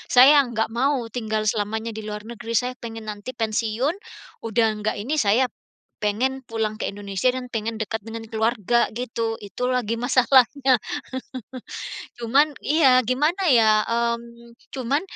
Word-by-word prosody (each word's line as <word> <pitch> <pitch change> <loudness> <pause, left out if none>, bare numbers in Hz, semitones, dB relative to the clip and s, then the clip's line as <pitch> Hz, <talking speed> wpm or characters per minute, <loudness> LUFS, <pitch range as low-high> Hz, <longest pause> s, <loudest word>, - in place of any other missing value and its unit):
Saya 280 +3 +8
enggak 225 -3 -2
mau 255 +1 0
tinggal 220 -2 -2
selamanya 220 +2 -1
di 220 - -6
luar 210 0 -5
negeri. 230 -1 -6
Saya 250 +3 0
pengen 225 -2 -8
nanti 205 +4 -7
pensiun, 225 +6 0 0.5
udah 225 +1 +3
enggak 215 +1 -1
ini, 255 +9 -2
saya 225 +3 +3 0.6
pengen 260 +6 0
pulang 220 -1 -2
ke - - -1
Indonesia, 200 +3 -1
dan 255 -1 -5
pengen 225 -1 -3
dekat 220 0 -3
dengan 225 0 -6
keluarga, 225 0 +2
gitu. 230 -1 -3
Itu 205 +4 -4
lagi 235 -3 0
masalahnya. 255 +1 +4 1.4
Cuman, 270 +6 +3
iya, 280 -4 +5
gimana 300 - +1
ya, 220 -3 +5
mmm, 235 0 -3 0.2
cuman, 270 +3 0
235 Hz, 140 wpm, -23 LUFS, 220-255 Hz, 1.4 s, Saya